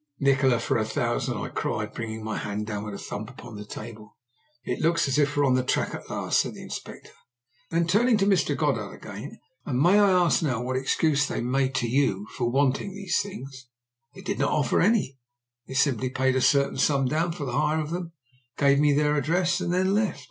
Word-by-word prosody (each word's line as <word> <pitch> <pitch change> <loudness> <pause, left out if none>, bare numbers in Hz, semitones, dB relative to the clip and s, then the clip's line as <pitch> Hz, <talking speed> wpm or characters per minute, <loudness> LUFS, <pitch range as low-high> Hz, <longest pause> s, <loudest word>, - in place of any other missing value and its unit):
"Nikola, 135 -3 +3
for 115 - 0
a - - +1
thousand!" 110 - -1
I - - -4
cried, - - -3
bringing 110 -1 -5
my 110 0 -3
hand 105 +1 -3
down 105 -1 -4
with 105 -1 -6
a - - -6
thump 105 +3 -6
upon 120 -3 -11
the 105 0 -8
table. 110 0 -10 0.5
"It - - -3
looks 165 0 +2
as 135 +2 +1
if 145 0 +1
we're 145 - +4
on 130 - +3
the 130 - +3
track - - 0
at - - -8
last," - - 0
said - - -1
the - - -10
Inspector. - - -8 0.6
Then, 165 +1 +1
turning 220 +7 +3
to 195 - +2
Mr. 195 -2 +2
Goddard - - -1
again: - - -9 0.2
"And 125 -2 -2
may 180 +8 +5
I 205 -1 +5
ask 180 -2 +3
now 130 -8 0
what 125 +1 -3
excuse 145 +2 +1
they - - -3
made 130 +2 0
to 120 - 0
you 115 -6 +1
for 120 -1 0
wanting 135 +8 0
these 200 -3 -1
things!" 135 -10 -9 0.5
"They - - -10
did - - -3
not - - +2
offer - - +2
any; 185 - +1 0.5
they 130 - -7
simply 130 -2 +1
paid 130 0 +1
a 130 - +2
certain 140 0 +2
sum 140 -1 +2
down 160 +6 0
for 155 -4 -5
the 125 - -4
hire 155 +5 +1
of 155 0 -4
them, 170 -1 -4 0.4
gave 140 0 +4
me 145 0 +4
their 150 +1 +2
address, 170 +4 +1
and 175 -1 -1
then 185 +2 +2
left." 210 -4 0
140 Hz, 220 wpm, -26 LUFS, 125-170 Hz, 0.6 s, may